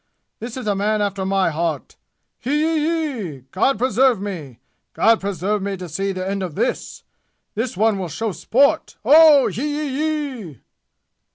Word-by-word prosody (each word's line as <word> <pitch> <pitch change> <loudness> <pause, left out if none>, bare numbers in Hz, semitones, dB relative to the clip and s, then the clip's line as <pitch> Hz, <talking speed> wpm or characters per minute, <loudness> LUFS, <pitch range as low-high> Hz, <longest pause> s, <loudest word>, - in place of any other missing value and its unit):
This 235 +2 -7
is 255 - -6
a 210 - +1
man 210 +2 0
after 200 -2 -2
my 190 -3 +1
heart! 160 -1 -3 0.4
Hee 285 +4 -1
yee 315 0 +1 0.4
yee! 145 -8 -8
God 225 +7 +1
preserve 250 0 +2
me! 170 - -6 0.4
God 225 0 +3
preserve 200 +1 -2
me 195 0 -3
to 180 0 -7
see 195 +5 -2
the 185 0 -4
end 195 0 -2
of 175 -5 -5
this! - - -3 0.5
This 225 -2 -3
one 215 -1 +2
will 180 -3 -4
show 220 +8 -3
sport! 280 - +1
Oh 295 0 +7
yee - - -3
yee 295 -2 -2
yee!" 155 - -11
210 Hz, 165 wpm, -21 LUFS, 190-265 Hz, 0.5 s, Oh